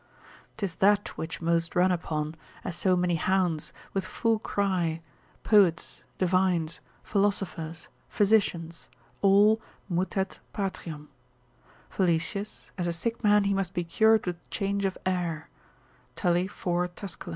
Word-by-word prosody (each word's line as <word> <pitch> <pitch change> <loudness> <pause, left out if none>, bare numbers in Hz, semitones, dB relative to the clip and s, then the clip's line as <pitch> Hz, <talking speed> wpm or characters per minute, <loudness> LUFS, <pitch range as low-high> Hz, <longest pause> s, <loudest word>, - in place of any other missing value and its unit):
'Tis 195 -5 -2
that 205 +1 +3
which 165 +1 -6
most 165 0 +1
run 180 +1 +4
upon, 155 -3 -2 0.3
as 180 - -4
so 185 +1 +2
many 180 -1 +1
hounds, 175 -1 +1 0.2
with 195 - 0
full 225 +4 0
cry, 185 -6 0 0.4
poets, 195 -6 +3 0.2
divines, 180 -3 +1 0.2
philosophers, 180 -5 -1 0.2
physicians, 185 -6 +1 0.3
all, 205 +3 +5 0.3
mutet 190 +1 -1
patriam: 165 -7 -4 0.8
Valesius: 185 +3 -1
as 175 - 0
a 170 - 0
sick 230 +8 -3
man 210 -1 +5
he 200 0 +1
must 195 -1 -2
be 175 - 0
cured 220 +6 +3
with 175 -1 -2
change 200 -1 -1
of 190 - -1
air, 175 -4 -2 0.6
Tully 175 0 +1
4 180 -2 -1
Tuscul. 180 +1 -8
185 Hz, 125 wpm, -28 LUFS, 170-200 Hz, 0.8 s, all